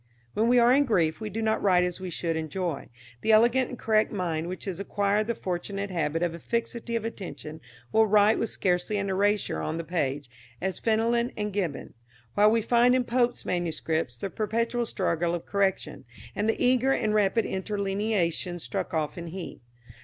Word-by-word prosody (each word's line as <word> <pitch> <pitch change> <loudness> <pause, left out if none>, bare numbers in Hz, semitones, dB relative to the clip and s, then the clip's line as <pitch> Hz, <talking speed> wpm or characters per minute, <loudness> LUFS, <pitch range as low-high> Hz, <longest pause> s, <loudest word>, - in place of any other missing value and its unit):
"When 220 +2 +1
we 245 +1 +4
are 240 +1 +6
in 285 +2 +4
grief 170 - +1
we 215 - -3
do 225 +1 -3
not 220 0 +1
write 180 -3 +4
as 180 0 -2
we 185 -1 -5
should 165 -1 -2
in 160 -1 -3
joy. 170 -2 -3 0.3
The 220 - +2
elegant 240 +3 +4
and 250 - -7
correct 220 -1 +2
mind, 170 -5 -2
which 185 +1 -6
has 190 -3 -4
acquired 205 +1 0
the 235 - -1
fortunate 195 +2 -4
habit 165 -1 -1
of 170 -1 0
a 170 - -8
fixity 235 +3 -3
of 225 -1 -2
attention, 175 -7 -7 0.3
will 220 0 +4
write 210 +1 +4
with 230 - -1
scarcely 180 +3 0
an 200 -1 -1
erasure 205 +2 +1
on 160 - -2
the 165 - -3
page, 145 -5 -2 0.3
as 190 0 -3
Fenelon 235 +2 +1
and 210 -1 -2
Gibbon; 180 -8 -3 0.4
while 210 +1 +5
we 225 0 +2
find 245 +2 +4
in 255 - +2
Pope's 245 0 0
manuscripts 160 -6 -2
the 190 +10 -5
perpetual 230 +2 -1
struggle 175 -4 0
of 170 - -6
correction, 200 -2 -1 0.3
and 210 +2 0
the - - 0
eager 255 +1 +3
and 215 -5 +1
rapid 215 +2 +2
interlineations 195 -3 -1
struck - - -3
off 155 +1 -2
in 170 - -6
heat. 175 -3 -7
200 Hz, 190 wpm, -27 LUFS, 175-225 Hz, 0.4 s, are